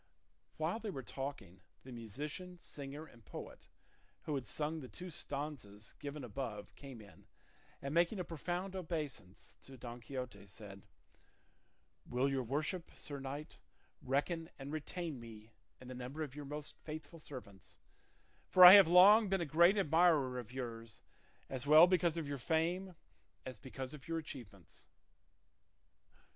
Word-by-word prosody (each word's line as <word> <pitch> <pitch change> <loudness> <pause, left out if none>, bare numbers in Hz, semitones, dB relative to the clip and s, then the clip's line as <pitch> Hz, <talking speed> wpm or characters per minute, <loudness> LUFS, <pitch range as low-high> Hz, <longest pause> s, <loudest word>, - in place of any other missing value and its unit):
While 165 +8 -1
they 225 - -4
were 135 -9 -5
talking, 135 -9 -6 0.2
the 130 - -10
musician, 145 - -6
singer, 145 -2 -8
and 120 -6 -18
poet, - - -9 0.6
who 155 - -3
had 135 -5 -3
sung 155 +7 -2
the 130 - -8
two 180 +6 -9
stanzas 140 -9 -6
given 145 0 -6
above 115 -3 -5
came 135 -5 -10
in, 100 -6 -17 0.6
and 140 +1 -3
making 175 +5 +3
a - - -1
profound 175 +3 -4
obeisance 150 - -5
to 135 -1 -12
Don 120 0 -8
Quixote 125 -4 -6
said, 100 -1 -10 1.3
"Will 125 +2 +1
your 135 -1 0
worship, 150 +8 -2
sir 145 -1 -6
knight, 140 +3 -7 0.4
reckon 160 +5 -1
and 135 +1 -7
retain 155 -1 -4
me 110 -1 -11 0.3
in 125 - -12
the 130 - -6
number 125 +5 -5
of 140 -4 -6
your 145 0 -7
most 150 +1 -5
faithful 155 +2 -8
servants, 125 -10 -10 0.7
for 185 -1 +9
I 180 - +14
have 200 -4 +10
long 195 +5 +8
been 195 -1 +1
a - - 0
great 170 +6 +5
admirer 160 -7 +3
of 120 -2 -9
yours, 115 -3 -7 0.4
as 130 +1 -5
well 155 +3 +10
because 175 -2 +2
of 160 -3 -3
your 140 -1 -4
fame 170 +6 0 0.5
as 130 -5 -7
because 130 +3 -6
of 145 -3 -11
your 165 0 -1
achievements?" 115 - -9
145 Hz, 150 wpm, -36 LUFS, 125-165 Hz, 1.3 s, I